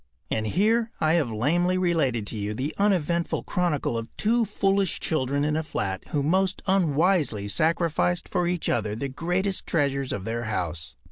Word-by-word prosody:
And 110 0 0
here 220 - +2
I 155 0 +3
have 160 -8 +2
lamely 170 +12 +1
related 155 - +1
to 110 - -5
you 105 0 -3
the 135 +6 -3
uneventful 175 -4 +1
chronicle 150 -9 0
of 115 - -6
two 230 +2 +2
foolish 195 -2 0
children 140 -2 0
in 150 0 0
a 160 - +1
flat 95 -11 -3
who 145 -2 -1
most 185 +5 +1
unwisely 165 - +2
sacrificed 165 - +1
for 175 - 0
each 175 -1 -1
other 105 -2 0
the 135 +5 -3
greatest 180 +7 -1
treasures 140 -4 0
of 95 - -4
their 115 +1 -3
house. 85 -6 -3
155 Hz, 165 wpm, -26 LUFS, 120-180 Hz, -, I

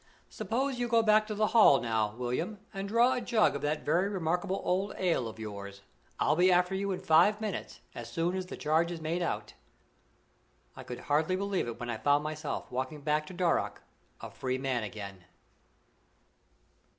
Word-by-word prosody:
"Suppose 260 +2 -2
you 245 - 0
go 230 -1 +3
back 215 0 +4
to 215 - -4
the 215 +1 +2
Hall, 215 -12 +7
now, 110 -2 -1
William, 125 - -2 0.2
and 195 0 -4
draw 235 +4 +4
a 250 - -2
jug 230 -2 +2
of - - -4
that 150 +1 -2
very 175 +6 +2
remarkable 185 +1 -1
old 190 +3 0
ale 170 -10 +1
of 110 - -8
yours? 100 -2 -7 0.4
I'll 150 - +3
be 180 +3 +4
after 180 +1 +3
you 195 +1 -1
in 185 - -2
five 175 +7 +4
minutes, 215 -4 -5
as 120 0 -8
soon 170 +5 0
as 185 -1 -3
the - - -7
charge 160 +3 +1
is 170 - -5
made 160 +3 -2
out." 170 - -3 1.2
I - - -8
could 125 - -7
hardly 155 +5 +1
realize 195 -5 -1
it 115 0 -6
when 120 -1 -4
I 115 - -3
found 145 +6 +2
myself 155 -1 -4
walking 130 +4 -3
back 150 +1 0
to - - -9
Darrock 175 -2 0 0.4
a - - -7
free 130 -1 -2
man 130 -2 -1
again. 100 -3 -7
165 Hz, 185 wpm, -30 LUFS, 130-200 Hz, 1.2 s, Hall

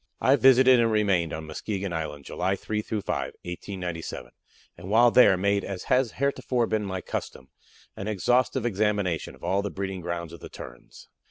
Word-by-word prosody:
I 130 +4 +4
visited 130 -2 +6
and 115 -1 +3
remained 100 -7 +2
on 80 +1 -5
Muskegon 95 +4 -4
Island 75 -3 -5
July 95 +2 -1
3 105 +2 -3
5, 110 - -4
1897, 90 -7 -5 0.4
and 95 - -10
while 120 +3 +5
there 100 -7 +6
made, 100 +1 +1
as 95 -2 -5
has 125 -3 +2
heretofore 130 -3 0
been 110 -1 -1
my 95 -1 -4
custom, 65 -6 -6 0.5
an 100 - -6
exhaustive 120 - +1
examination 105 -5 -1
of - - -22
all 100 +1 +1
the 100 - -3
breeding 95 -1 -5
grounds 85 -1 -4
of 85 - -10
the - - -10
Terns. - - -12
100 Hz, 170 wpm, -26 LUFS, 85-115 Hz, 0.5 s, visited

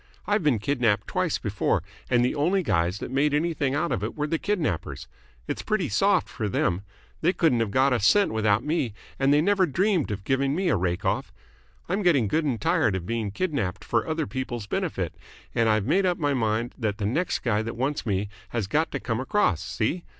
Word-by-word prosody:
I've 210 0 +1
been 150 -7 +3
kidnapped 115 -2 +1
twice - - 0
before, - - 0 0.3
and 120 0 +3
the - - 0
only 180 +6 +1
guys 90 - +1
that 120 - -6
made 145 +2 +2
anything 150 -3 0
out 170 +3 0
of - - -1
it - - -3
were 150 - -1
the 160 +1 -1
kidnappers. 165 - -2 0.4
It's - - -3
pretty 195 -6 -1
soft 195 - +2
for 110 -5 -3
them. 95 -1 0 0.4
They 175 +4 +3
couldn't 155 -11 +2
have 115 -2 0
got 130 +5 +3
a 120 - +2
cent 195 - +4
without 110 0 +2
me, 145 -9 -1 0.2
and 135 +1 +3
they 145 +1 +5
never 195 +1 +3
dreamed 180 +2 +1
of 100 -2 -4
giving 135 +5 +1
me 185 +1 +1
a - - +3
rake 90 0 -1
off. - - -1 0.6
I'm 195 +4 0
getting 150 - +3
good 155 +9 +1
and 125 -6 -1
tired 100 0 +2
of 90 -2 -4
being 115 -1 -2
kidnapped 110 - -2
for 115 - 0
other 160 -1 -1
people's 125 -5 -4
benefit, - - -2 0.4
and 115 -1 +2
I've 110 -2 +2
made 185 - +2
up 180 - +1
my 145 -2 0
mind 115 -1 0
that 105 -4 -1
the 105 - -2
next 160 - -1
guy 110 -4 +1
that 115 +1 -5
wants 135 +4 -1
me 100 -2 -1 0.2
has 115 -4 -2
got 155 - +1
to 140 - -1
come 115 -3 -2
across. 130 - +1
See? 165 +11 -2
130 Hz, 215 wpm, -26 LUFS, 110-160 Hz, 0.6 s, they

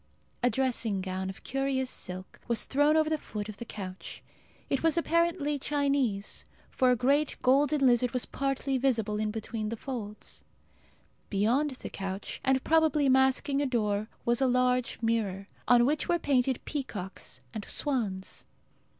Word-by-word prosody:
A 245 - +4
dressing 235 -4 0
gown, 190 0 -3
of 190 - -9
curious 270 -1 -1
silk, 185 +1 -4
was 235 -3 +2
thrown 290 +3 +3
over 310 -1 +3
the 310 -1 0
foot 210 -5 -6
of 215 -2 -7
the 235 - -7
couch. 190 -4 -7 0.4
It 275 - 0
was 325 0 +2
apparently 335 -3 +1
Chinese; 275 -8 0 0.3
for 255 - +3
a 250 - +5
great 280 +5 +1
golden 275 +2 +3
lizard 245 0 +4
was 250 0 0
partly 275 -1 -1
visible 225 -5 +1
in 215 0 0
between 220 0 -3
the 230 - -4
folds. 215 -5 -6 0.9
Beyond 230 +9 +2
the - - -5
couch, 195 0 -5
and 265 -1 +2
probably 315 -3 +3
masking 265 +2 +3
a 285 - +1
door, 215 -4 0 0.2
was 235 +2 +2
a 265 - +4
large 250 0 +1
mirror, 210 -4 0 0.2
on 240 -1 +6
which 290 +3 0
were 345 - +4
painted 265 -5 +1
peacocks 210 -10 -5
and 215 -2 -4
swans. 215 -10 -2
250 Hz, 155 wpm, -29 LUFS, 215-280 Hz, 0.9 s, on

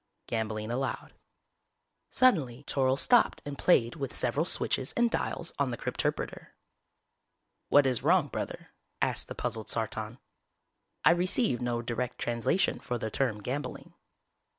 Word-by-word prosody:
(Gambling 110 -1 -3
allowed) 135 +3 -3 1.0
Suddenly 145 - +2
Toryl 135 -2 +1
stopped 240 - +3
and 145 -1 -5
played 120 -7 +3
with 135 -4 -4
several - - +1
switches 130 - +1
and 240 -1 +2
dials - - -2
on - - +2
the - - -4
crypterpreter. - - -3 1.1
"What 145 -1 +6
is 130 -3 +1
wrong, 165 +2 +3
Brother?" - - -6 0.3
asked - - +1
the - - -7
puzzled 110 -1 -3
Sartan. 110 0 -2 0.9
"_I 165 +4 +7
receive 180 - +1
no 120 -1 -1
direct 120 +1 -3
translation 120 +11 0
for 120 - -3
the 110 -1 -4
term 110 -6 0
'gambling'. 140 +6 -5
130 Hz, 130 wpm, -29 LUFS, 115-145 Hz, 1.1 s, I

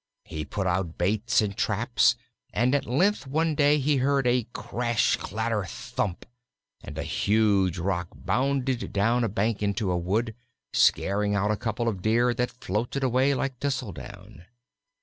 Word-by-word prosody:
He 75 0 -6
put 95 +6 -3
out 90 -2 -1
baits 110 +6 +2
and 100 -1 -3
traps, 110 +4 +2 0.4
and 125 +4 +1
at 145 - 0
length 180 - +1
one 160 +3 +1
day 145 0 +4
he 145 0 +1
heard 135 +1 +1
a 120 -2 +2
crash, 120 -1 0
clatter, 110 0 -2
thump, 90 +1 -4 0.6
and - - -9
a - - -2
huge 100 -4 +2
rock 90 0 -1
bounded 130 -1 -1
down 115 +5 +2
a 115 - 0
bank 105 +2 -1
into 100 -1 0
a 90 - +1
wood, 110 +6 -1 0.4
scaring 100 +1 +2
out 100 +1 +1
a - - +1
couple 115 +2 -2
of 100 -5 -2
deer 120 +4 +2
that 125 0 -1
floated 120 +3 -3
away 130 +2 +2
like 130 -1 -3
thistle 135 -6 -2
down. 75 +2 -11
115 Hz, 160 wpm, -26 LUFS, 100-130 Hz, 0.6 s, day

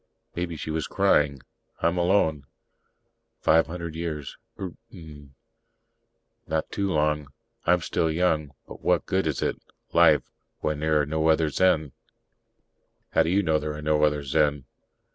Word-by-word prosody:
Maybe 85 -1 -3
she 80 - -5
was 80 -1 -2
crying. 70 -3 +2 0.4
"I'm 85 +2 +2
alone. 80 -6 +2 0.9
Five 80 +1 +4
hundred 85 -1 -6
years, 80 -4 -5 0.2
Eert 95 -3 -5 0.2
mn 75 - -13 1.1
not 80 0 -2
too 100 -1 -1
long. 75 -2 +1 0.4
I'm 90 +1 +4
still 80 0 0
young. 80 -3 0
But - - -11
what - - +1
good 95 -3 0
is 75 - -1
it - - -2 0.3
life - - +5 0.3
when 75 -1 -2
there 80 0 +2
are - - 0
no 80 +2 0
other 80 -1 +3
Zen?" 80 -3 +2 1.2
"How - - +4
do 80 - +1
you 100 +3 +2
know 80 -3 +2
there 75 0 -4
are 75 - -7
no 75 0 +2
other 75 -1 +2
Zen?" 70 0 +1
80 Hz, 150 wpm, -26 LUFS, 75-85 Hz, 1.2 s, life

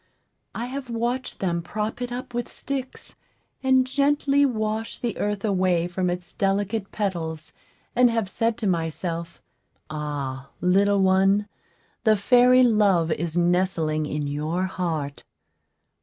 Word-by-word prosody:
I 235 - -3
have 260 0 -6
watched 240 +2 -2
them 170 -3 0
prop 210 +7 -4
it 245 0 -3
up 245 0 -6
with 240 0 -3
sticks, 265 -2 -6 0.5
and 260 -1 +4
gently 285 +1 +2
wash 220 -2 -2
the 240 -2 -3
earth 205 0 -1
away 185 -4 +2
from 180 +1 -1
its 175 0 -5
delicate 200 +1 -1
petals, 165 -6 -3 0.4
and 245 0 +6
have 225 -3 0
said 225 +4 -1
to 225 - -4
myself, 170 -1 -3 0.5
"Ah, 140 -3 -4
little 195 +2 +3
one, 195 +2 +3 0.6
the 220 -3 +4
fairy 250 +4 +5
Love 200 -8 +3
is 165 +1 -2
nestling 170 -3 +1
in 150 0 -2
your 155 +5 -2
heart." 165 -7 -3
195 Hz, 130 wpm, -24 LUFS, 170-235 Hz, 0.6 s, and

